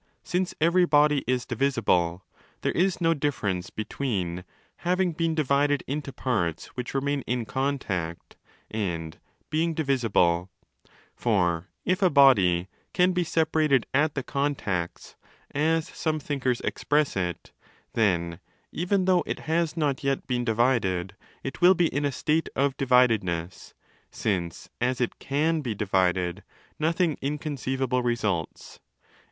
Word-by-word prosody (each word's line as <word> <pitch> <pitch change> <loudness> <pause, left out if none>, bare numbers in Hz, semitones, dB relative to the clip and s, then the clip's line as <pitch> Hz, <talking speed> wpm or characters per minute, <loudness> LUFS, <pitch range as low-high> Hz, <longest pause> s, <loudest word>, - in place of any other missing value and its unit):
since 180 +1 -1
every 170 +3 +4
body 150 -2 +4
is 125 -1 0
divisible, 95 -10 +1 0.4
there - - 0
is 185 +2 +1
no 165 -1 +3
difference 105 - -2
be 110 - -5
tween 90 -11 -3 0.3
'having 180 0 +1
been 165 0 -1
divided 145 -1 +2
into 140 0 -4
parts 90 -13 -1
which 125 +2 -5
remain 140 +1 0
in 120 -1 -1
contact' 110 -12 -3 0.4
and 85 -7 -3 0.3
'being 160 +1 +1
divisible'. 110 - +1 0.7
For 90 -6 +1 0.2
if 185 +3 +1
a 185 - +5
body 100 - +5 0.3
'caz 180 0 +4
be 180 0 +1
separated 155 -5 +2
at 145 +2 +2
the 135 - -2
contacts' 125 -13 -2 0.4
(as 160 +2 +1
some 155 -1 -2
thinkers 130 -4 -1
express 150 -1 0
it), 90 -3 -3 0.4
then, 85 -6 +1 0.3
even 185 +2 0
though 185 -2 +4
it - - -3
has 165 +1 0
not 145 -2 0
yet 135 -1 0
been 125 -2 -1
divided, 110 -6 +1 0.3
it 135 -3 -6
will 180 +2 +7
be 170 -2 +2
in 145 0 0
a 140 - +1
state 155 +5 0
of 140 0 +1
dividedness—since, 95 -6 -1
as 125 +1 +1
it 125 - -2
caw 155 +4 0
be 120 -6 -3
divided, 95 -3 0 0.4
nothing 165 0 +1
inconceivable 135 -3 -1
results.? 110 -9 -2
135 Hz, 130 wpm, -26 LUFS, 100-155 Hz, 0.7 s, will